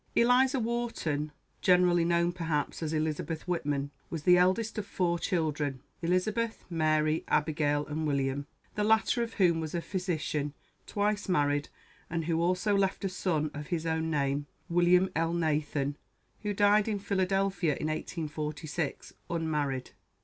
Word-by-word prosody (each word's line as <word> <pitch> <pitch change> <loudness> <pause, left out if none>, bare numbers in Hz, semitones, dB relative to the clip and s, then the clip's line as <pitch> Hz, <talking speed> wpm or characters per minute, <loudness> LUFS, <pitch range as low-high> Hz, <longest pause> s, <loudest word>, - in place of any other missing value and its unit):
"Eliza 255 +3 +4
Wharton," 225 -11 -2 0.3
generally 180 -1 +4
known, 170 0 +2
perhaps, 165 -4 -2
as 155 -2 -2
Elizabeth 155 +1 -2
Whitman, 145 -5 -1 0.2
was 160 -3 -4
the 180 +1 +7
eldest 210 +5 +2
of 200 - -5
four 175 -3 0
children 150 -6 -1 0.2
Elizabeth, 210 +7 0
Mary, 155 -1 +2
Abigail, 150 -1 +1
and 155 +1 -2
William; 140 0 -1 0.3
the 210 - -1
latter 220 +3 +3
of 230 -1 -3
whom 175 -5 +3
was 160 +1 -4
a - - +1
physician, 160 -6 -2 0.3
twice 205 0 0
married, 145 -4 +1 0.4
and 165 -1 -2
who 165 0 +1
also 185 +4 +2
left 195 0 +1
a - - +1
son 160 -5 -1
of 150 0 -6
his 165 -2 -2
own 160 0 0
name, 145 -1 0 0.2
(William 175 +2 +4
Elnathan,) 155 -3 0 0.5
who 210 - -1
died 205 +1 +4
in 215 -2 0
Philadelphia 195 -4 +1
in 155 - -3
1846, 155 -1 -3 0.2
unmarried. 150 -6 -1
165 Hz, 140 wpm, -30 LUFS, 150-190 Hz, 0.5 s, the